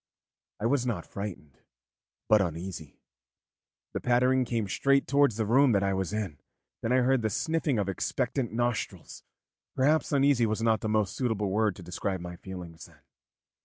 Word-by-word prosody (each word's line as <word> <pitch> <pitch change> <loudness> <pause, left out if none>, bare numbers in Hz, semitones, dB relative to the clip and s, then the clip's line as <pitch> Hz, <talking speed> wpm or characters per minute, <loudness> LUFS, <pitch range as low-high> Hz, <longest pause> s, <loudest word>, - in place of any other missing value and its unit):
I 105 - -3
was 130 +1 +2
not 110 -9 -2
frightened, 85 -10 -7 0.7
but 105 -1 +5
uneasy. 85 -3 -5 1.0
The - - -2
pattering 125 +1 +3
came 115 -3 -1
straight 140 +7 +2
towards 140 -3 +3
the 110 0 -1
room 130 +3 +4
that 100 -1 +2
I 95 0 +1
was 95 -1 -2
in, 100 -9 -3 0.4
then 115 - -1
I 130 0 +4
heard 130 0 +3
the 110 - 0
sniffing 160 +1 0
of 100 -2 0
expectant 115 +6 -2
nostrils; 120 +1 -3 0.5
perhaps 150 +4 +2
'uneasy' 140 -4 +3
was 110 +1 -1
not 110 -2 +2
the 110 - -2
most 105 -3 +1
suitable 110 -6 -1
word 105 -1 +1
to 90 - -11
describe 95 +2 -3
my 90 0 -7
feelings 90 -4 -9
then. 80 -4 -22
110 Hz, 165 wpm, -28 LUFS, 95-125 Hz, 1.0 s, but